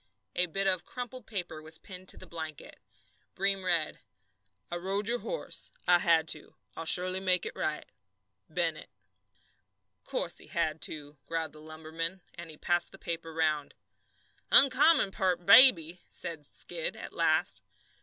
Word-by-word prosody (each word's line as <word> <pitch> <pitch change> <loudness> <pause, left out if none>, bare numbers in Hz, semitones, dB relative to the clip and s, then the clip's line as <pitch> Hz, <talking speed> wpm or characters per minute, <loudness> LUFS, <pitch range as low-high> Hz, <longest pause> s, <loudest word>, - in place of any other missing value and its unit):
A 180 - +2
bit 195 +4 0
of 185 -3 +2
crumpled 250 +1 -8
paper 180 -7 -4
was 160 +1 -3
pinned 185 -1 -11
to - - +5
the - - -10
blanket. 160 -3 -7 0.6
Breem 195 0 +1
read: 170 -4 0 0.7
I 175 - -2
rode 195 +4 -1
your 240 +1 0
horse. - - -6 0.2
I 175 -1 +6
had 165 -2 +3
to. - - -1 0.2
I'll 165 - -6
surely 185 +2 +2
make 185 -2 +1
it - - -6
right. 155 -1 -3 0.6
BENNETT. 165 -1 -2 1.1
"Course - - -2
he - - -16
had 155 0 -2
to!" 145 -1 -3
growled 165 -2 -3
the 155 - -13
lumberman, 160 +3 -5
and 170 -1 -10
he 155 - -11
passed 175 +2 +1
the - - -10
paper 165 -1 -5
round. 155 -2 -1 0.8
"Oncommon 275 -3 +6
peart 180 -2 -1
baby," 180 - +7
said 160 -4 -5
Skid, - - -3
at - - -9
last. - - +1
175 Hz, 150 wpm, -30 LUFS, 160-195 Hz, 1.1 s, baby